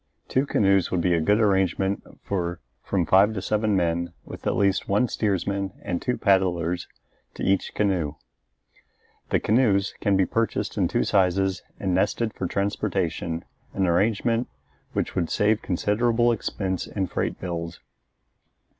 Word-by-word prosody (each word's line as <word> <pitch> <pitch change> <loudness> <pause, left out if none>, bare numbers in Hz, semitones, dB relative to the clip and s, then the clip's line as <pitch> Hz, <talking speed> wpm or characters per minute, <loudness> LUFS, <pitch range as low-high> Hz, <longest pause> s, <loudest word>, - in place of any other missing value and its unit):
Two 135 +2 +1
canoes 95 -6 +3
would 90 - 0
be 90 0 +2
a 85 - +2
good 105 +7 +3
arrangement 95 -2 +1 0.2
for 85 -3 -2 0.2
from 95 -4 0
five 100 +6 +4
to - - -1
seven 105 +2 0
men, 85 -1 0
with - - -8
at - - +1
least 100 -2 +1
one 105 +6 +3
steersman 100 -2 -1
and 90 -3 -2
two 125 - -1
paddlers 90 -3 +1 0.5
to - - -6
each 95 0 +1
canoe. 90 -8 0 1.1
The - - +2
canoes 105 -4 +2
can 100 -3 +2
be 95 - +3
purchased 115 +3 -1
in - - +2
two - - +1
sizes 95 0 +2 0.2
and 95 -2 -1
nested 105 +4 +1
for 90 - -3
transportation, 95 -4 -2 0.3
an 95 - +2
arrangement 110 +6 +1 0.5
which - - -1
would 85 -3 -1
save 105 +1 +2
considerable 115 +6 +1
expense 95 -4 -2
in 95 -2 -2
freight - - -3
bills. 85 -2 -5
95 Hz, 145 wpm, -25 LUFS, 90-105 Hz, 1.1 s, five